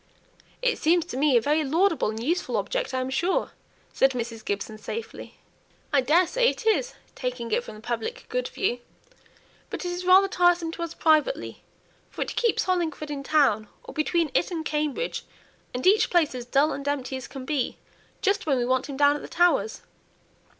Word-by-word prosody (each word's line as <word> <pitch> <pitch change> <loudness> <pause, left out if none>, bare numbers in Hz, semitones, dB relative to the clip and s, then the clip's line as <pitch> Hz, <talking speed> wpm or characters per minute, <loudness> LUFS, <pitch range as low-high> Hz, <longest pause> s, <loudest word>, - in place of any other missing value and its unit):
"It - - +1
seems 340 +1 +3
to 340 - -7
me 275 -1 +4
a - - +3
very 300 +5 +2
laudable 330 - +2
and 220 +1 -4
useful 340 +7 0
object, - - -2
I 260 -1 -1
am 255 +1 -3
sure," 345 +8 0 0.4
said 270 0 +3
Mrs. 230 -2 -5
Gibson, 215 +1 -4
safely. 455 - -7 0.6
"I 280 - +5
daresay 360 - +3
it - - -6
is, 485 +3 +1 0.2
taking 250 -2 -4
it 240 - +1
from - - -10
the 215 - -12
public 450 - -4
good - - -2
view. 245 -11 -1 0.9
But - - -5
it's 355 0 -3
rather 375 +2 +6
tiresome 350 -3 +2
to 340 - -8
us 335 -1 -4
privately, 315 +9 +1 0.5
for - - -3
it - - -7
keeps 470 -2 +2
Hollingford 325 -5 -1
in 285 -1 -4
town 275 -8 +2 0.2
or - - -10
between 320 0 0
it - - +2
and 330 -3 -4
Cambridge 300 - -2 0.5
and 250 +1 -4
each 410 +3 +5
place 335 -6 +2
as 245 -1 -6
dull 280 +5 +3
and 280 0 -6
empty 275 -2 -2
as 260 - -6
can 265 -2 -8
be, 280 -3 -1 0.5
just 400 -4 +1
when 275 -3 +3
we 245 - 0
want 260 +2 0
him 275 - -5
down 285 0 +5
at 295 - -5
the - - -8
Towers. 275 -12 +2
300 Hz, 190 wpm, -26 LUFS, 255-355 Hz, 0.9 s, rather